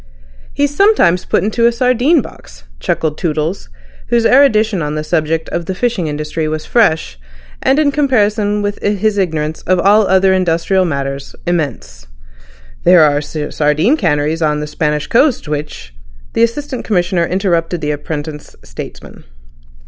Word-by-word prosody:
"He's 285 Hz, 0 st, -1 dB
sometimes 340 Hz, -, +3 dB
put -, -, +1 dB
into 230 Hz, +3 st, +2 dB
a -, -, +3 dB
sardine 255 Hz, +6 st, +2 dB
box," -, -, -14 dB, 0.2 s
chuckled 155 Hz, -, -2 dB
Toodles, 160 Hz, +2 st, -2 dB, 0.4 s
whose 235 Hz, -1 st, +1 dB
erudition 220 Hz, -8 st, +4 dB
on 150 Hz, 0 st, -3 dB
the 155 Hz, -, -3 dB
subject 160 Hz, 0 st, -1 dB
of 170 Hz, -1 st, -4 dB
the 190 Hz, -, -3 dB
fishing 225 Hz, -6 st, -1 dB
industry 150 Hz, +1 st, -3 dB
was 155 Hz, 0 st, -4 dB
fresh 160 Hz, -, +1 dB, 0.4 s
and, 270 Hz, -, +2 dB
in 300 Hz, -2 st, +3 dB
comparison 210 Hz, -7 st, +1 dB
with 205 Hz, 0 st, -3 dB
his 205 Hz, 0 st, 0 dB
ignorance 160 Hz, -4 st, -2 dB
of 185 Hz, +1 st, +3 dB
all 205 Hz, +3 st, +4 dB
other 190 Hz, 0 st, +3 dB
industrial 185 Hz, +1 st, +1 dB
matters, 140 Hz, -3 st, -4 dB
immense. 140 Hz, -, -3 dB, 0.8 s
"There 175 Hz, -2 st, +6 dB
are 145 Hz, -1 st, +2 dB
sardine 150 Hz, -, 0 dB
canneries 160 Hz, -, 0 dB
on 150 Hz, -1 st, +1 dB
the 150 Hz, -, -3 dB
Spanish 150 Hz, -1 st, -2 dB
coast 250 Hz, -, +1 dB
which—" 150 Hz, -, -5 dB, 0.4 s
The -, -, 0 dB
Assistant 255 Hz, +3 st, -1 dB
Commissioner 180 Hz, -4 st, 0 dB
interrupted 175 Hz, -3 st, -1 dB
the 150 Hz, -1 st, -1 dB
apprentice 150 Hz, 0 st, -6 dB
statesman. -, -, -10 dB
175 Hz, 145 wpm, -15 LUFS, 150-215 Hz, 0.8 s, There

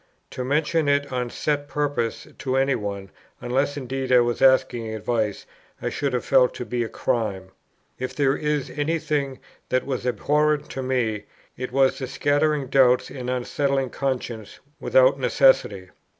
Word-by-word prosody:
To 125 Hz, -, -4 dB
mention 150 Hz, +3 st, +1 dB
it 140 Hz, -1 st, +1 dB
on 125 Hz, -1 st, -1 dB
set 145 Hz, +2 st, -2 dB
purpose 145 Hz, -6 st, -2 dB
to 130 Hz, -1 st, -2 dB
any 135 Hz, +1 st, +2 dB
one, 100 Hz, -3 st, -4 dB, 0.3 s
unless 135 Hz, +4 st, -1 dB
indeed 130 Hz, -1 st, -4 dB
I 125 Hz, -1 st, +7 dB
was 120 Hz, 0 st, -1 dB
asking 130 Hz, -3 st, +3 dB
advice, 110 Hz, -1 st, -2 dB, 0.3 s
I -, -, -2 dB
should 140 Hz, -2 st, -2 dB
have 125 Hz, -, -1 dB
felt 125 Hz, -, +4 dB
to 125 Hz, -, -5 dB
be 120 Hz, +2 st, -1 dB
a 115 Hz, -, -5 dB
crime. 95 Hz, -5 st, -2 dB, 0.5 s
If 130 Hz, 0 st, -4 dB
there 140 Hz, -2 st, +2 dB
is 150 Hz, -2 st, -2 dB
any 150 Hz, +3 st, -1 dB
thing 145 Hz, -4 st, -2 dB, 0.3 s
that 130 Hz, 0 st, +1 dB
was 130 Hz, -2 st, -3 dB
abhorrent 150 Hz, +3 st, +1 dB
to 135 Hz, -, -4 dB
me, 125 Hz, -5 st, -1 dB, 0.3 s
it 130 Hz, 0 st, -5 dB
was 135 Hz, +1 st, +2 dB
the 130 Hz, -, -4 dB
scattering 145 Hz, +2 st, +1 dB
doubts, 130 Hz, -1 st, +3 dB
and 125 Hz, -2 st, -5 dB
unsettling 135 Hz, +1 st, -1 dB
consciences 125 Hz, -5 st, -4 dB, 0.2 s
without -, -, +4 dB
necessity. -, -, +2 dB
130 Hz, 160 wpm, -24 LUFS, 125-145 Hz, 0.5 s, I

